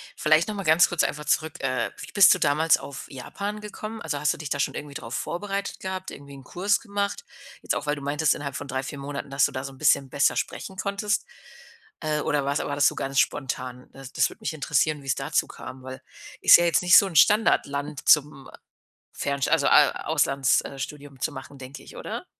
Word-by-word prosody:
vielleicht 155 Hz, +2 st, +3 dB
noch 215 Hz, -, -4 dB
mal 195 Hz, -, -4 dB
ganz 160 Hz, +1 st, +5 dB
kurz 175 Hz, -, +1 dB
einfach 150 Hz, 0 st, -3 dB
zurück. 155 Hz, +1 st, -1 dB
Äh, 130 Hz, 0 st, -1 dB
wie -, -, -9 dB
bist 200 Hz, -3 st, +7 dB
du 185 Hz, -, -2 dB
damals 160 Hz, +2 st, +3 dB
auf 140 Hz, -, -9 dB
Japan 200 Hz, +11 st, -6 dB
gekommen? 215 Hz, +1 st, -7 dB
Also, 145 Hz, -, -3 dB
hast 150 Hz, -, +1 dB
du -, -, -10 dB
dich 150 Hz, -2 st, -7 dB
da 145 Hz, -, -2 dB
schon -, -, 0 dB
irgendwie 145 Hz, -1 st, -7 dB
drauf 115 Hz, -2 st, -7 dB
vorbereitet 200 Hz, +7 st, -4 dB
gehabt? 190 Hz, 0 st, -5 dB
Irgendwie 140 Hz, 0 st, -11 dB
'n 135 Hz, -1 st, -12 dB
Kurs 190 Hz, +8 st, 0 dB
gemacht. 200 Hz, -, -3 dB, 0.4 s
Jetzt -, -, -1 dB
auch, -, -, -4 dB
weil 145 Hz, 0 st, 0 dB
du 145 Hz, -, -9 dB
meintest 145 Hz, +2 st, +1 dB
innerhalb 140 Hz, -2 st, -6 dB
von 145 Hz, -, -6 dB
3, 130 Hz, 0 st, -2 dB
4 140 Hz, +2 st, -7 dB
Monaten, 140 Hz, 0 st, -6 dB
dass 135 Hz, 0 st, +3 dB
du -, -, -2 dB
da 130 Hz, -, -5 dB
so 135 Hz, 0 st, -7 dB
'n -, -, -16 dB
bisschen 135 Hz, -2 st, +2 dB
besser 140 Hz, +2 st, +2 dB
sprechen 190 Hz, -, -4 dB
konntest. 200 Hz, +2 st, -1 dB, 0.8 s
Äh, 155 Hz, -1 st, -1 dB
oder 145 Hz, -2 st, 0 dB
was 140 Hz, +1 st, 0 dB
war 145 Hz, -, -3 dB
das 145 Hz, -, +4 dB
so -, -, 0 dB
ganz 135 Hz, 0 st, -1 dB
spontan? 125 Hz, -2 st, -2 dB
Äh, 135 Hz, -, -14 dB
das 135 Hz, -1 st, -11 dB
das -, -, +2 dB
würde -, -, -14 dB
mich -, -, -3 dB
interessieren, 150 Hz, 0 st, 0 dB
wie's 135 Hz, -, -1 dB
dazu 135 Hz, +1 st, -1 dB
kam, 130 Hz, 0 st, -10 dB
weil 130 Hz, 0 st, -8 dB, 0.4 s
ist -, -, +9 dB
ja 175 Hz, -, +1 dB
jetzt 170 Hz, -, +2 dB
nicht 180 Hz, -1 st, +7 dB
so 200 Hz, -, +6 dB
'n 180 Hz, -, -9 dB
"Standardland" 145 Hz, -7 st, +2 dB
zum, 150 Hz, -4 st, +3 dB
äh, -, -, -14 dB, 0.6 s
Fernsch 140 Hz, -1 st, -2 dB
also, -, -, +2 dB
A -, -, +4 dB
Auslands 135 Hz, -1 st, +2 dB
äh, 135 Hz, -, -9 dB
Studium 145 Hz, -1 st, -8 dB
zu -, -, -1 dB
machen, 140 Hz, -, -10 dB
denke 130 Hz, +1 st, -10 dB
ich, -, -, -14 dB
oder? -, -, -6 dB
145 Hz, 230 wpm, -25 LUFS, 135-175 Hz, 0.8 s, ist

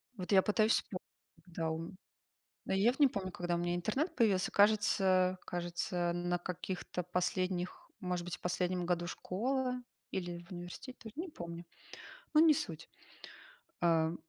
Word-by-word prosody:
Вот 185 Hz, -2 st, -5 dB
я 195 Hz, -1 st, +8 dB
пытаюсь 215 Hz, +2 st, +3 dB
вспомнить, 185 Hz, -, -1 dB, 0.4 s
когда 165 Hz, -2 st, -2 dB
у 160 Hz, -, -2 dB
м 165 Hz, +3 st, -7 dB, 0.7 s
Но -, -, -2 dB
я 200 Hz, +5 st, +5 dB
вот 260 Hz, -, -7 dB
не 285 Hz, -, +8 dB
помню, 190 Hz, -6 st, -4 dB
когда 175 Hz, -1 st, -1 dB
у -, -, -1 dB
меня 175 Hz, 0 st, 0 dB
интернет 265 Hz, -, 0 dB
появился, 200 Hz, -8 st, +3 dB
кажется 190 Hz, -3 st, +4 dB
кажется 175 Hz, 0 st, -1 dB
на 175 Hz, 0 st, 0 dB
каких-то 180 Hz, 0 st, -4 dB
последних, 180 Hz, -, -1 dB
может 180 Hz, -3 st, -2 dB
быть, 175 Hz, 0 st, -4 dB
в -, -, -27 dB
последнем 180 Hz, 0 st, 0 dB
году 175 Hz, -1 st, +1 dB
школы 250 Hz, +8 st, -1 dB, 0.3 s
или 175 Hz, -2 st, -4 dB
в -, -, -10 dB
университете 175 Hz, +9 st, -7 dB
тоже, 220 Hz, -1 st, -10 dB
не 345 Hz, +4 st, -3 dB
помню. 170 Hz, -, -7 dB, 0.7 s
Но 305 Hz, -, +8 dB
не 320 Hz, -1 st, +7 dB
суть. 165 Hz, -, -4 dB, 0.9 s
Э. 165 Hz, -1 st, +3 dB
180 Hz, 160 wpm, -34 LUFS, 175-210 Hz, 0.9 s, я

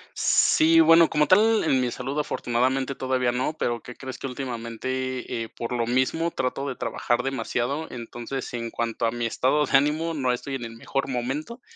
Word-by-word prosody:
Sí, 165 Hz, +1 st, +4 dB
bueno, 165 Hz, 0 st, +7 dB
como 150 Hz, 0 st, +3 dB
tal 215 Hz, +5 st, +5 dB
en 135 Hz, -5 st, +2 dB
mi 125 Hz, -, 0 dB
salud, 135 Hz, +4 st, -4 dB
afortunadamente 130 Hz, -1 st, 0 dB
todavía 130 Hz, -2 st, 0 dB
no, 130 Hz, +5 st, -1 dB
pero 120 Hz, -1 st, -1 dB
¿qué 125 Hz, -, -10 dB
crees?, 130 Hz, -1 st, -8 dB
que -, -, -4 dB
últimamente, 125 Hz, 0 st, -4 dB
eh, 115 Hz, -, -8 dB
por 115 Hz, -, -6 dB
lo 115 Hz, -1 st, 0 dB
mismo 130 Hz, +7 st, +1 dB
trato 135 Hz, -2 st, -2 dB
de 130 Hz, -, -4 dB
trabajar 120 Hz, 0 st, -1 dB
demasiado. 135 Hz, +2 st, -2 dB
Entonces, 120 Hz, +2 st, -6 dB
en 115 Hz, -1 st, -3 dB
cuanto 115 Hz, 0 st, -2 dB
a -, -, 0 dB
mi 120 Hz, 0 st, -3 dB
estado 135 Hz, +6 st, +1 dB
de 135 Hz, -, 0 dB
ánimo, 150 Hz, +4 st, +2 dB
no 130 Hz, -5 st, 0 dB
estoy 135 Hz, +3 st, -4 dB
en 120 Hz, -3 st, -3 dB
el 115 Hz, -, -8 dB
mejor 135 Hz, +4 st, -3 dB
momento 135 Hz, -, -3 dB
130 Hz, 190 wpm, -25 LUFS, 120-145 Hz, -, bueno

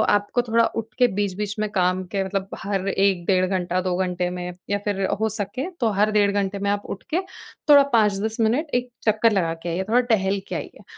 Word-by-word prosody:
आपको 205 Hz, +4 st, 0 dB
थोड़ा 230 Hz, -1 st, +2 dB, 0.2 s
उठ -, -, -16 dB
के 245 Hz, -, +6 dB
बीच-बीच 205 Hz, +1 st, -2 dB
में 215 Hz, -1 st, 0 dB
काम 185 Hz, -1 st, +1 dB
के 195 Hz, -1 st, +1 dB
मतलब, 195 Hz, 0 st, -2 dB, 0.2 s
हर 195 Hz, -1 st, -2 dB
1 195 Hz, -3 st, +1 dB
डेढ़ 185 Hz, -1 st, +3 dB
घंटा, 185 Hz, -1 st, -1 dB
2 180 Hz, -1 st, -1 dB
घंटे 180 Hz, -1 st, -1 dB
में 180 Hz, 0 st, -5 dB, 0.2 s
या 205 Hz, -, +1 dB
फिर 200 Hz, -1 st, -1 dB, 0.2 s
हो 220 Hz, -, +2 dB
सके, 250 Hz, -, -3 dB
तो 230 Hz, -, +2 dB
हर 215 Hz, +1 st, +4 dB
डेढ़ 205 Hz, -1 st, +3 dB
घंटे 200 Hz, 0 st, -1 dB
में 200 Hz, 0 st, -1 dB
आप 205 Hz, 0 st, -2 dB
उठ -, -, -23 dB
के 360 Hz, -, +2 dB, 0.5 s
थोड़ा 285 Hz, -1 st, +9 dB
5-10 215 Hz, 0 st, +2 dB
मिनट 240 Hz, +9 st, +2 dB
एक 245 Hz, 0 st, 0 dB, 0.2 s
चक्कर 220 Hz, +1 st, +3 dB
लगा 170 Hz, -4 st, +1 dB
के 175 Hz, -, -3 dB
आइए, 180 Hz, +3 st, -1 dB
थोड़ा 245 Hz, +3 st, +4 dB
टहल 195 Hz, -1 st, +1 dB
के -, -, -3 dB
आइए। -, -, -7 dB
200 Hz, 220 wpm, -23 LUFS, 185-220 Hz, 0.5 s, थोड़ा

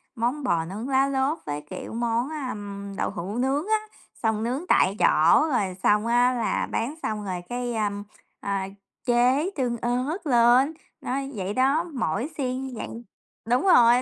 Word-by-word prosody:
món 245 Hz, +5 st, -1 dB
bò 170 Hz, -9 st, +1 dB
nướng 215 Hz, +9 st, -6 dB
lá 270 Hz, +1 st, +3 dB
lốt 275 Hz, +3 st, 0 dB
với, 145 Hz, 0 st, -3 dB
kiểu, -, -, -7 dB
món, 235 Hz, +3 st, 0 dB, 0.2 s
ờm, 200 Hz, -2 st, -6 dB
đậu -, -, 0 dB
hủ 190 Hz, +6 st, -5 dB
nướng 275 Hz, +8 st, 0 dB
á, 435 Hz, 0 st, +3 dB, 0.4 s
xong 220 Hz, 0 st, +1 dB
nướng 260 Hz, +9 st, -2 dB
tại 195 Hz, -, +4 dB
chỗ 165 Hz, -, +5 dB
rồi 190 Hz, -6 st, 0 dB
xong 210 Hz, +1 st, +3 dB
á 245 Hz, +2 st, +4 dB
là 235 Hz, -3 st, -1 dB
bán 265 Hz, +7 st, -2 dB
xong 210 Hz, -1 st, -2 dB
rồi 180 Hz, -2 st, -3 dB
cái, 245 Hz, 0 st, -3 dB
ờm, 205 Hz, -2 st, -1 dB, 0.4 s
a, 195 Hz, -1 st, -2 dB, 0.4 s
chế 250 Hz, +7 st, +3 dB
tương 245 Hz, -4 st, -1 dB
ớt 250 Hz, -, -1 dB
lên, 245 Hz, +4 st, +5 dB, 0.3 s
nó 260 Hz, -, -2 dB, 0.2 s
vậy 195 Hz, 0 st, -3 dB
đó. 275 Hz, +7 st, +3 dB
Mỗi 240 Hz, -, -1 dB
xiên 255 Hz, -1 st, -2 dB
như 255 Hz, -, -8 dB
vậy -, -, -4 dB, 0.6 s
đúng 245 Hz, +4 st, +2 dB
rồi, 245 Hz, -8 st, +6 dB
240 Hz, 170 wpm, -25 LUFS, 210-265 Hz, 0.6 s, rồi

